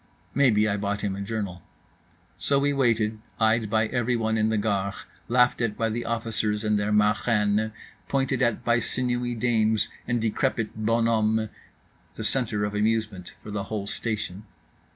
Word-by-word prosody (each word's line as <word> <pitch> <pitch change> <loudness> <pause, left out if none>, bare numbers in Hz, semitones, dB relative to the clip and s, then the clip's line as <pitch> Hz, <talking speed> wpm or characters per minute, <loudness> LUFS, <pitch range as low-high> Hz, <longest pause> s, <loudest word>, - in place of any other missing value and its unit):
Maybe 110 -6 +4
I 100 -1 0
bought 100 0 -2
him 100 -2 -1
a 100 - -5
journal. 100 -3 -4 0.7
So 140 - +1
we 145 +1 +2
waited, 115 -5 +1 0.2
eyed 110 -1 +3
by 110 0 +2
everyone 115 -1 0
in 110 0 +2
the 110 - +1
Gare, 100 -2 0 0.3
laughed 125 +1 +3
at 110 -3 -1
by 115 -1 +1
the 120 +2 -3
officers 110 -2 -1
and 105 -1 +2
their 105 +1 -1
marraines, 105 0 +2 0.4
pointed 135 -1 0
at 120 -1 +1
by 120 0 +3
sinewy 120 +1 -1
dames 110 -2 +2 0.2
and 120 0 +1
decrepit 110 0 -1
bonhommes—the 110 -1 -1
centre 110 -6 +1
of 105 - -4
amusement 105 -3 -1
for 105 - -8
the 100 -1 -3
whole 105 -1 -3
station. 105 -2 -4
110 Hz, 150 wpm, -26 LUFS, 105-115 Hz, 0.7 s, Maybe